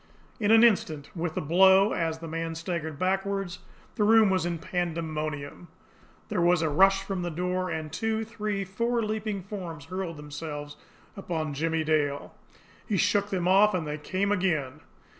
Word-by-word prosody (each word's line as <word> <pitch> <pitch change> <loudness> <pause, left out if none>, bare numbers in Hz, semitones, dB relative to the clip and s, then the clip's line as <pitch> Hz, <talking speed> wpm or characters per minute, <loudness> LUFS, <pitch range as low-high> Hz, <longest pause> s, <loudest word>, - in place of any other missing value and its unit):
In 210 -2 +1
an 225 +1 +7
instant, 160 -10 +2
with 165 -1 -3
the - - -1
blow, 190 +6 +5
as 165 -2 -1
the 165 0 -8
man 165 0 -3
staggered 165 -2 -4
backward, 195 +1 -1 0.4
the 215 - 0
room 220 -1 +5
was 185 -2 +1
in 170 -1 -2
pandemonium. 160 -3 -4 0.6
There 200 -5 0
was 175 -1 +3
a 160 - +1
rush 195 +5 +4
from 195 -2 -3
the 175 - -2
door, 180 +2 -2
and 155 -2 -4
two, 225 0 -1
three, 210 -3 -3
four 235 +5 -1
leaping 215 -2 -3
forms 175 -7 -7
hurled 185 -2 -5
themselves 145 0 -7 0.4
upon 160 -6 -3
Jimmie 160 +2 0
Dale. 145 -2 0 0.5
He 205 - 0
shook 200 +2 +2
them 180 -3 -1
off 200 +2 +5
and 170 -3 -2
they 150 0 -4
came 190 +6 -1
again. 155 -8 0
180 Hz, 165 wpm, -27 LUFS, 160-195 Hz, 0.6 s, an